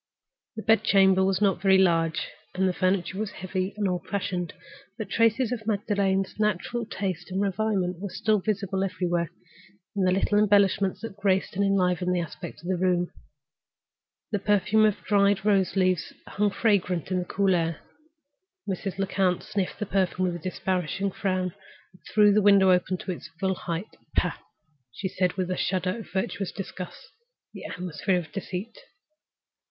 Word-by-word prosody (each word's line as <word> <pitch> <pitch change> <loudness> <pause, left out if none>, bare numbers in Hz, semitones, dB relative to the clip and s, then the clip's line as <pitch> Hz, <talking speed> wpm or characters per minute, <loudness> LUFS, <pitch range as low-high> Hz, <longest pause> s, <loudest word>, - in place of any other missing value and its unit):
The 220 - -6
bed 225 0 +4
chamber 190 -1 +5
was 190 +1 +1
not 195 -4 +2
very 190 -1 +5
large, 165 -3 +2 0.3
and 190 +1 +2
the 185 - +1
furniture 185 +1 0
was 215 -1 -2
heavy 185 +1 -4
and 205 -2 +1
old 180 -1 -2
fashioned. 180 -3 -2 0.5
But 220 - -5
evidences 230 +2 +3
of 225 -3 -4
Magdalen's 200 -2 0
natural 215 +3 -1
taste 185 -5 -4
and 190 +1 -2
refinement 195 -2 0
were 210 +2 0
visible 195 -2 -1
everywhere, 175 -3 -1 0.7
in 200 - 0
the 185 -1 +3
little 195 +2 +2
embellishments 200 -2 +3
that 225 -3 -6
graced 195 -2 +1
and 200 - +1
enlivened 180 -2 +2
the - - +1
aspect 165 -1 -7
of - - -8
the 185 -1 0
room. 180 -1 +1 1.2
The 205 - 0
perfume 210 +2 +3
of 210 -2 0
dried 200 -1 +3
rose 195 -3 +2
leaves 185 -3 +1
hung 210 0 0
fragrant 190 -5 +1
on 185 - +1
the 180 - -3
cool 195 +1 +1
air. 165 -2 0 0.9
Mrs. 195 0 -3
Lecount 190 -2 +1
sniffed 195 -3 -2
the 210 - -3
perfume 185 -1 0
with 175 -1 -1
a - - -5
disparaging 185 +2 -2
frown 185 -2 -1 0.4
and 180 - -21
threw 210 -1 +6
the 210 - +4
window 195 -2 +6
up 180 -1 +3
to 185 +1 -3
its 175 - -7
full 190 0 +1
height. 175 +2 -5 0.2
"Pah!" - - +1 0.5
she 190 - -4
said, 185 -1 0
with 185 -1 -2
a - - 0
shudder 185 +3 -1
of 220 - -10
virtuous 190 0 -2
disgust, 185 -2 -8 0.4
"the - - -9
atmosphere 180 +1 -1
of 175 -3 -5
deceit!" 195 - -6
190 Hz, 165 wpm, -26 LUFS, 180-205 Hz, 1.2 s, threw